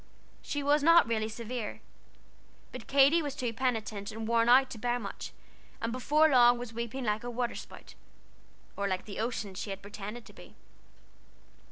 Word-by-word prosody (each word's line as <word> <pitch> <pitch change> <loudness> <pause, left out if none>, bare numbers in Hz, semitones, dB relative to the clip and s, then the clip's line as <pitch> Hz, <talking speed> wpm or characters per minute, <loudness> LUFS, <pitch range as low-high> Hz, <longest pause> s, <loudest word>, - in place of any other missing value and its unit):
She 290 -1 -3
was 290 +1 +3
not 335 +3 +6
really 220 -1 -1
severe, 230 0 -5 0.9
but 255 -2 -9
Katy 280 +4 +5
was 290 -3 -4
too 240 -2 -3
penitent 225 -4 -2
and 220 0 -6
worn 230 0 +3
out 260 +2 +6
to 225 - -7
bear 245 +2 0
much, 245 - -7 0.5
and 230 - -2
before 295 +5 +3
long 245 -4 +6
was 240 -1 -7
weeping 235 +3 -4
like 215 0 -1
a 245 - -4
water 240 0 -2
spout, - - -11 0.8
or 200 0 -1
like 185 -1 -2
the 200 - -7
ocean 220 -4 -3
she 200 +2 -6
had 195 0 -6
pretended 210 +3 -8
to - - -15
be. - - -15
235 Hz, 175 wpm, -30 LUFS, 220-260 Hz, 0.9 s, not